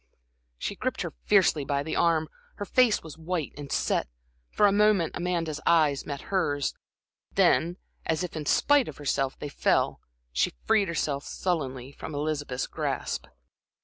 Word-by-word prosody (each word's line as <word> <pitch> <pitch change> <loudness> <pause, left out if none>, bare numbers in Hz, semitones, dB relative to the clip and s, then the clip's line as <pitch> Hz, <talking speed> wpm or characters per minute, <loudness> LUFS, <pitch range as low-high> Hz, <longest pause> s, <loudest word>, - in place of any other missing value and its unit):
She - - -3
gripped - - -2
her - - -5
fiercely 145 - +4
by 140 +1 -1
the 160 - -3
arm, 160 -2 +3 0.3
her 205 - -5
face 245 0 +3
was 160 -1 -10
white 165 -2 -3
and 145 -1 -8
set. - - +1 0.4
For 210 - +3
a 200 - +6
moment 205 -4 +3
Amanda's 170 -4 -2
eyes 155 -5 +3
met 140 -1 -4
hers. 145 -7 +1 0.6
Then, 175 +2 +3 0.3
as 160 +2 +1
if 180 - -5
in 150 -2 -4
spite 290 -3 +4
of - - -8
herself, 135 -2 -1
they - - -5
fell, 145 - +1 0.3
she - - +1
freed 210 -3 +3
herself 145 -4 -1
sullenly 135 -8 -2
from 145 +2 -8
Elizabeth's 145 -3 -2
grasp. - - -3
155 Hz, 155 wpm, -27 LUFS, 145-180 Hz, 0.6 s, a